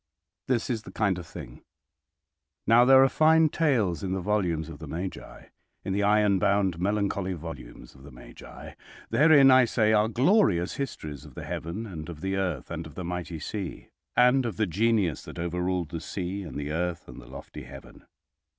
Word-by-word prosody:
This 125 Hz, -3 st, 0 dB
is 115 Hz, -3 st, -2 dB
the -, -, -12 dB
kind 100 Hz, -4 st, 0 dB
of 85 Hz, -, -10 dB
thing— -, -, -10 dB, 1.0 s
"Now 120 Hz, +2 st, +6 dB
there 135 Hz, +1 st, +7 dB
are -, -, +5 dB
fine 160 Hz, +2 st, +4 dB
tales 115 Hz, -, +1 dB
in 95 Hz, -1 st, -3 dB
the 95 Hz, -, -1 dB
volumes 90 Hz, -5 st, -1 dB
of 80 Hz, -3 st, -10 dB
the 80 Hz, -, -8 dB
Magi—in 90 Hz, +3 st, -8 dB
the 100 Hz, -, 0 dB
iron 105 Hz, -1 st, +3 dB
bound 95 Hz, -3 st, +1 dB
melancholy 100 Hz, -1 st, -1 dB
volumes 80 Hz, -7 st, -9 dB
of 65 Hz, -, -18 dB
the 70 Hz, -, -12 dB
Magi. -, -, -12 dB, 0.4 s
Therein, 145 Hz, -3 st, +6 dB
I 130 Hz, -1 st, +6 dB
say, 110 Hz, -2 st, +2 dB
are 105 Hz, 0 st, +3 dB
glorious 120 Hz, -, +2 dB
histories 75 Hz, -, -5 dB
of -, -, -14 dB
the -, -, -7 dB
heaven 90 Hz, +8 st, -5 dB
and 85 Hz, -6 st, -8 dB
of 80 Hz, -3 st, -9 dB
the 95 Hz, +1 st, -2 dB
earth, 90 Hz, -8 st, -3 dB
and 80 Hz, +1 st, -5 dB
of 75 Hz, -, -15 dB
the 90 Hz, -, -5 dB
mighty 90 Hz, -1 st, -4 dB
sea—and 125 Hz, -, -1 dB
of 115 Hz, -6 st, -4 dB
the 110 Hz, -, +2 dB
genius 100 Hz, -, +1 dB
that -, -, -10 dB
overruled 90 Hz, 0 st, -2 dB
the 85 Hz, -2 st, -5 dB
sea, 95 Hz, +3 st, -4 dB
and 85 Hz, -6 st, -8 dB
the 75 Hz, +1 st, -4 dB
earth, 85 Hz, +1 st, -3 dB
and -, -, -11 dB
the -, -, -15 dB
lofty -, -, -10 dB
heaven. 70 Hz, +1 st, -13 dB
95 Hz, 185 wpm, -27 LUFS, 85-110 Hz, 1.0 s, there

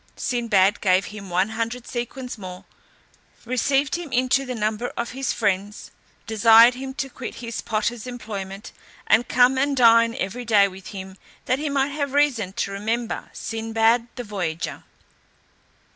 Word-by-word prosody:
Sinbad 210 Hz, -6 st, +1 dB
gave 185 Hz, -1 st, +3 dB
him 205 Hz, -2 st, -9 dB
one 185 Hz, +3 st, +1 dB
hundred 230 Hz, +2 st, -3 dB
sequins 245 Hz, +1 st, -5 dB
more, 185 Hz, -3 st, -9 dB, 0.8 s
received 270 Hz, +4 st, +1 dB
him 345 Hz, -5 st, -4 dB
into 255 Hz, +2 st, +1 dB
the 250 Hz, -, -3 dB
number 215 Hz, +2 st, -1 dB
of 235 Hz, 0 st, -3 dB
his 265 Hz, +1 st, -2 dB
friends, 205 Hz, -1 st, -2 dB, 0.3 s
desired 225 Hz, +1 st, +6 dB
him 265 Hz, +1 st, -6 dB
to 275 Hz, -1 st, -2 dB
quit 260 Hz, -1 st, -8 dB
his 230 Hz, -1 st, -5 dB
porter's 230 Hz, +1 st, -2 dB
employment, 205 Hz, -4 st, -7 dB, 0.3 s
and 240 Hz, -, +3 dB
come 250 Hz, +2 st, +4 dB
and 280 Hz, 0 st, +1 dB
dine 230 Hz, -1 st, +5 dB
every 230 Hz, +6 st, -4 dB
day 210 Hz, -4 st, +4 dB
with 190 Hz, 0 st, -11 dB
him, 190 Hz, -1 st, -8 dB, 0.3 s
that 255 Hz, -, +1 dB
he 300 Hz, 0 st, -2 dB
might 280 Hz, 0 st, +1 dB
have 280 Hz, -2 st, -3 dB
reason 265 Hz, -10 st, +2 dB
to 195 Hz, -, -2 dB
remember 225 Hz, +4 st, -3 dB
Sinbad 225 Hz, +1 st, 0 dB
the 245 Hz, -, -5 dB
voyager. 180 Hz, -7 st, -4 dB
230 Hz, 150 wpm, -23 LUFS, 205-255 Hz, 0.8 s, desired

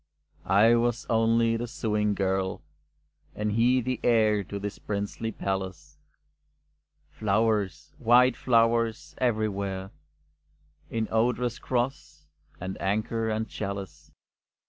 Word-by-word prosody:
I 105 Hz, +5 st, +5 dB
was 120 Hz, 0 st, +1 dB
only 115 Hz, 0 st, +3 dB
the 120 Hz, +1 st, -4 dB
sewing 105 Hz, -3 st, -1 dB
girl, 95 Hz, -1 st, -1 dB, 0.7 s
and 105 Hz, 0 st, -1 dB
he 120 Hz, +4 st, +3 dB
the 125 Hz, 0 st, -2 dB
heir 110 Hz, -3 st, +3 dB
to 100 Hz, +1 st, -5 dB
this 100 Hz, 0 st, -5 dB
princely 100 Hz, +2 st, -3 dB
palace. 95 Hz, -2 st, -4 dB, 1.1 s
Flowers, 105 Hz, -4 st, 0 dB
white 125 Hz, +2 st, +5 dB
flowers, 115 Hz, -2 st, +1 dB
everywhere, 100 Hz, -5 st, -1 dB, 1.0 s
In 110 Hz, -1 st, -2 dB
odorous 120 Hz, +1 st, +1 dB
cross, 125 Hz, -, -3 dB, 0.3 s
and 95 Hz, +1 st, -6 dB
anchor, 110 Hz, +3 st, -1 dB
and 110 Hz, +1 st, -1 dB
chalice. 100 Hz, -3 st, -6 dB
110 Hz, 100 wpm, -27 LUFS, 100-115 Hz, 1.1 s, I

